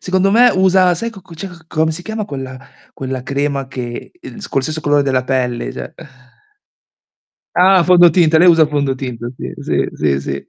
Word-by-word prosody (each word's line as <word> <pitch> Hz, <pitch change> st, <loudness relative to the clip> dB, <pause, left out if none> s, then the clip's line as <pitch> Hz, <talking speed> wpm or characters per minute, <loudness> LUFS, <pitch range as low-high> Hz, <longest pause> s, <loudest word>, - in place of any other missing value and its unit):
secondo 190 Hz, +1 st, +1 dB
me 245 Hz, +3 st, +6 dB
usa, 185 Hz, -1 st, +3 dB
sai 230 Hz, +7 st, -4 dB
cocco 190 Hz, -5 st, -14 dB
cioè 195 Hz, +4 st, -7 dB, 0.2 s
come 160 Hz, 0 st, 0 dB
si 170 Hz, +3 st, -8 dB
chiama 220 Hz, +2 st, -4 dB
quella 130 Hz, -6 st, -7 dB, 0.3 s
quella 130 Hz, -1 st, -5 dB
crema 140 Hz, 0 st, -2 dB
che, 120 Hz, -2 st, -7 dB
ehm 325 Hz, -, -11 dB
con -, -, -1 dB
lo -, -, +2 dB
stesso 155 Hz, +3 st, -4 dB
colore 145 Hz, -1 st, +2 dB
della 130 Hz, -2 st, 0 dB
pelle 130 Hz, -1 st, -2 dB
cioè? -, -, -8 dB, 1.6 s
Ah, 185 Hz, 0 st, +5 dB
fondotinta, 175 Hz, -2 st, +5 dB
lei 180 Hz, +2 st, +6 dB
usa 165 Hz, -2 st, +6 dB
il 155 Hz, -, +3 dB
fondotinta, 130 Hz, -5 st, -3 dB
sì. -, -, -7 dB
sì, -, -, -1 dB
sì, 70 Hz, -2 st, 0 dB
sì. 70 Hz, 0 st, -6 dB
155 Hz, 175 wpm, -16 LUFS, 130-180 Hz, 1.6 s, me